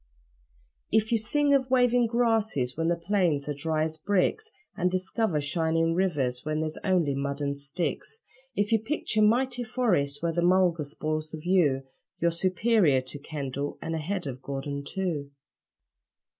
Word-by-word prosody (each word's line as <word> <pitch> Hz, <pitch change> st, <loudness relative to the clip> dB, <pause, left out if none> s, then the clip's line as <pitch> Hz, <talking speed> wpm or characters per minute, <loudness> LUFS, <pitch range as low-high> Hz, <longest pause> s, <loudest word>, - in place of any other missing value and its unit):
If 220 Hz, +1 st, +2 dB
you 230 Hz, -, +3 dB
sing 290 Hz, +6 st, +2 dB
of 260 Hz, -2 st, +2 dB
waving 245 Hz, -2 st, +4 dB
grasses 220 Hz, -, +1 dB
when 165 Hz, +1 st, -1 dB
the 170 Hz, -, +2 dB
plains 170 Hz, -5 st, 0 dB
are 145 Hz, -, -1 dB
dry 155 Hz, +2 st, -1 dB
as 160 Hz, 0 st, -3 dB
bricks, 205 Hz, -, +1 dB, 0.3 s
And 180 Hz, -, +1 dB
discover 185 Hz, -1 st, 0 dB
shining 165 Hz, +2 st, +1 dB
rivers 145 Hz, -9 st, 0 dB
where 155 Hz, 0 st, -2 dB
there's 155 Hz, 0 st, -3 dB
only 180 Hz, -7 st, +2 dB
mud 140 Hz, +1 st, -2 dB
and 140 Hz, -1 st, -1 dB
sticks; 155 Hz, -, -2 dB, 0.3 s
If 205 Hz, +2 st, 0 dB
you 225 Hz, -, +4 dB
picture 220 Hz, -2 st, -1 dB
'mighty 245 Hz, +3 st, +2 dB
forests' 205 Hz, -, 0 dB
where 170 Hz, -, +1 dB
the 175 Hz, -, 0 dB
mulga 175 Hz, -3 st, +3 dB
spoils 155 Hz, +2 st, -3 dB
the 160 Hz, -, -7 dB
view 155 Hz, -5 st, +2 dB, 0.4 s
You're 170 Hz, 0 st, +2 dB
superior 185 Hz, -, +2 dB
to 130 Hz, +3 st, -7 dB
Kendall, 140 Hz, -1 st, -4 dB
and 165 Hz, -, -4 dB
ahead 175 Hz, +4 st, -2 dB
of 130 Hz, -2 st, -6 dB
Gordon 140 Hz, +1 st, -4 dB
too. 165 Hz, -5 st, -3 dB
170 Hz, 155 wpm, -27 LUFS, 145-215 Hz, 0.4 s, waving